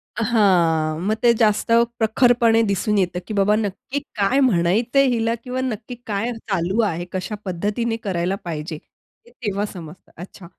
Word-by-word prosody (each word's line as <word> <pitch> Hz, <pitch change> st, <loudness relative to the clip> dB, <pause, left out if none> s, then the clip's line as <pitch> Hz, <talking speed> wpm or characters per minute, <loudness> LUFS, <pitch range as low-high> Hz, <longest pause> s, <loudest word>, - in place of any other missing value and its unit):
हां. 175 Hz, -9 st, +2 dB
मग 215 Hz, -, +2 dB
ते 235 Hz, -1 st, +6 dB
जास्त 215 Hz, 0 st, +2 dB, 0.3 s
प्रखरपणे 230 Hz, 0 st, +3 dB
दिसून 200 Hz, +2 st, 0 dB
येतं, 180 Hz, -2 st, 0 dB
की 220 Hz, -, -5 dB
बाबा 205 Hz, +1 st, +3 dB
नक्की 220 Hz, +6 st, -3 dB, 0.2 s
काय 210 Hz, +7 st, +2 dB
म्हणायचंय 230 Hz, +4 st, +3 dB
हिला 230 Hz, -1 st, +1 dB
किंवा 255 Hz, +1 st, -3 dB
नक्की 245 Hz, -1 st, -4 dB
काय 215 Hz, +4 st, -1 dB, 0.2 s
चालू 190 Hz, +3 st, 0 dB
आहे, 175 Hz, -5 st, -1 dB
कशा 190 Hz, +3 st, -4 dB
पद्धतीने 210 Hz, +6 st, -2 dB
करायला 185 Hz, -1 st, -1 dB
पाहिजे, 160 Hz, -1 st, -5 dB, 0.5 s
हे 240 Hz, -, -19 dB
तेव्हा 205 Hz, -4 st, -3 dB
समजतं. 170 Hz, 0 st, -11 dB
अच्छा. 180 Hz, +1 st, -11 dB
210 Hz, 145 wpm, -21 LUFS, 180-230 Hz, 0.5 s, ते